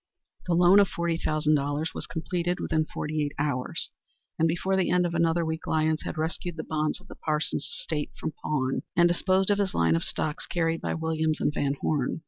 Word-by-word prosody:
The 175 - +2
loan 180 +3 +7
of 200 - +5
$40,000 155 -3 0
was - - -5
completed 175 +2 -2
within 155 -1 0
forty 155 0 -2
eight 145 0 -3
hours, 140 -3 -2 0.5
and 165 - +4
before 175 +4 0
the 190 -1 +2
end 180 0 +3
of 170 - -2
another 170 0 +2
week 160 0 -4
Lyons 155 0 +1
had - - -5
rescued 165 +2 -3
the 160 - -3
bonds 155 -1 -1
of - - -19
the - - -9
Parsons 155 0 -1
estate 150 -3 -2
from 160 - -3
pawn, 135 -4 0
and 175 0 +6
disposed 185 +3 +2
of 205 - +2
his 195 -2 0
line 80 -1 +3
of 85 - 0
stocks 150 -1 -3
carried 165 -1 0
by - - -2
Williams 160 -1 0
& 145 - +2
Van 140 -1 0
Horne. 145 -3 0
160 Hz, 200 wpm, -27 LUFS, 150-175 Hz, 0.5 s, loan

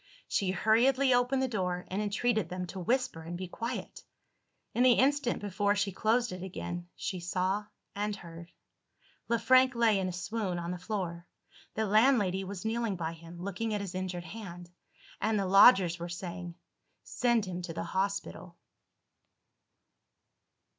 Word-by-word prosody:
She 195 -3 0
hurriedly 245 +8 +3
opened 250 +2 +2
the - - +1
door, 180 -6 -2
and 195 +3 -1
entreated 210 -2 0
them 180 +1 -4
to 185 +2 -7
whisper 230 -3 0
and 170 +2 -6
be 185 0 -5
quiet. 230 +7 -5 0.7
In 240 - +1
the 255 -1 +7
instant 275 -1 +2
before 205 0 +1
she 200 -1 0
closed 230 +5 +1
it 180 0 -6
again, 175 -1 -6
she 185 - -4
saw 185 +4 -1 0.3
and 205 +1 -1
heard. 170 -2 -11 0.8
Le 235 - +2
Frank 255 +2 +5
lay 225 -4 +3
in 190 - -1
a - - -2
swoon 185 +1 -3
on 170 0 -3
the 180 - -5
floor. 180 -3 -4 0.5
The 220 - 0
landlady 210 -3 +3
was 190 +1 -7
kneeling 225 -2 0
by 165 -2 -3
him, 165 +1 -12
looking 210 +3 -2
at 205 - -2
his 195 -2 -5
injured 185 -1 -4
hand; 175 -2 -9 0.5
and 220 0 +1
the 200 - 0
lodgers 190 -3 +6
were 170 +1 -5
saying, 175 0 -6 0.5
"Send 240 -3 +1
him 180 -1 -5
to 175 -1 -5
the 165 0 -3
hospital." 195 +3 -3
195 Hz, 160 wpm, -30 LUFS, 180-225 Hz, 0.8 s, the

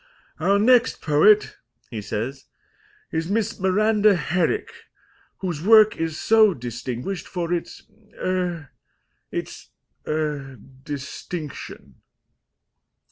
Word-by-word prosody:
"Our 200 +1 +3
next 245 +3 +4
poet," 205 +8 +4 0.3
he 110 -3 -4
says, 115 +7 -4 0.7
"is 160 +1 -2
Miss 220 +2 -1
Miranda 210 +2 +3
Herrick, 175 - -1 0.7
whose 175 -5 -3
work 215 +1 +6
is 165 -1 -3
so 215 -4 +4
distinguished 125 - -5
for 175 -2 -3
its 170 - -4 0.4
er 180 -5 -2 0.6
its - - -6 0.4
er 150 -3 -2 0.3
distinction." 145 +2 -7
175 Hz, 90 wpm, -23 LUFS, 145-210 Hz, 0.7 s, work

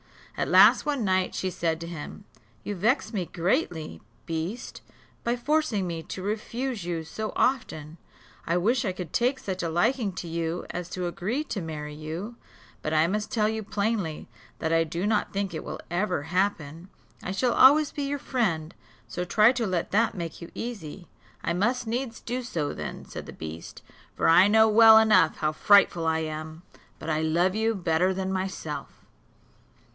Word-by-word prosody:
At - - -1
last, - - +7
one 285 -5 -1
night, 185 -1 +1
she 185 - -2
said 165 -2 -1
to - - -4
him, 170 +4 -8 0.4
"You 205 - -3
vex 225 +5 0
me 185 -5 -2
greatly, 170 - -1 0.2
beast, 165 +9 -4 0.4
by 235 +1 +1
forcing 250 -6 0
me 170 -2 -4
to 185 +3 -7
refuse 225 +2 -3
you 170 -2 -3
so 215 +7 -5
often; 165 - -1 0.5
I 170 +1 +2
wish 235 +8 +2
I 190 -5 -1
could 180 -4 -7
take 250 +3 +2
such 190 -5 -4
a 170 - -2
liking 215 +6 +1
to 175 - -6
you 165 +1 -3
as 175 0 -5
to 180 -1 -3
agree 195 - -2
to 220 -9 -4
marry 150 -2 -6
you, 165 +10 -6 0.4
but 155 - -3
I 155 +1 +4
must 210 +4 -2
tell 215 -4 +1
you 220 0 -2
plainly, 205 -6 -2 0.3
that 160 0 -1
I 165 0 +4
do 170 +4 -3
not 215 0 +1
think 200 -2 -2
it 160 - -5
will - - -6
ever 175 -4 0
happen. 170 -1 -2 0.3
I 180 - -4
shall 235 +5 +1
always 290 +3 +6
be 290 - -4
your 285 +1 -1
friend; 190 - -1 0.3
so 180 - -4
try 215 +6 +5
to 245 -4 -1
let 180 -3 -2
that 225 +3 +2
make 170 -2 -6
you 170 - -8
easy." 195 -7 -6 0.4
"I 170 - 0
must 240 +8 0
needs 230 +1 -3
do 250 +1 -3
so 165 -12 -3
then," - - -6
said - - -8
the - - -8
beast, 80 +1 -8 0.3
"for - - +1
I 180 +4 +7
know 220 +1 +5
well 220 0 +8
enough 210 -7 +5
how 155 -1 0
frightful 175 -1 +4
I 160 0 +2
am; 155 +1 -6 0.3
but 160 - -4
I 155 0 0
love 170 +4 +2
you 220 +1 +1
better 180 0 +1
than 190 0 -2
myself. 160 -8 -4
185 Hz, 180 wpm, -26 LUFS, 165-220 Hz, 0.5 s, well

